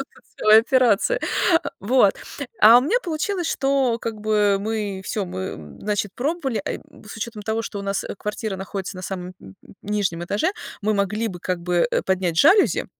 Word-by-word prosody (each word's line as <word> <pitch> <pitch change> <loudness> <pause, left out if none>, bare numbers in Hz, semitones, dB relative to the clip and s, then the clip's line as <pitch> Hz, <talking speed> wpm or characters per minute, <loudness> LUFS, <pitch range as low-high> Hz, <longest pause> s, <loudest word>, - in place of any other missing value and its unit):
это 275 - -5 0.3
целая 215 +1 +7
операция. 255 - +2 0.4
А, - - -3
вот, 205 -1 +4 0.5
а 225 +3 +9
у - - +3
меня 385 - +2
получилось, 350 +2 -2
что 270 -3 +1
как 225 -2 -5
бы 210 -2 +2
мы 205 -2 -3
всё, 200 +1 -2
мы, 80 - -7
значит, 205 -1 -2
пробовали. 270 -4 -2
А, - - -1 0.4
с - - -8
учетом 220 -1 -6
того, 220 +2 -2
что 210 - -6
у - - -5
нас 195 0 -2
квартира 210 -1 -4
находится 195 0 -6
на 185 - -8
самом 180 -1 -6
н 95 - -13
н - - -16
нижнем 195 -5 -1
этаже, 205 - 0 0.3
мы 215 +1 +1
могли 210 +3 0
бы 180 -4 -7
как 180 0 -2
бы, 175 +2 +1
э, - - 0
поднять 185 -3 0
жалюзи 390 - +4
210 Hz, 185 wpm, -22 LUFS, 190-240 Hz, 0.5 s, а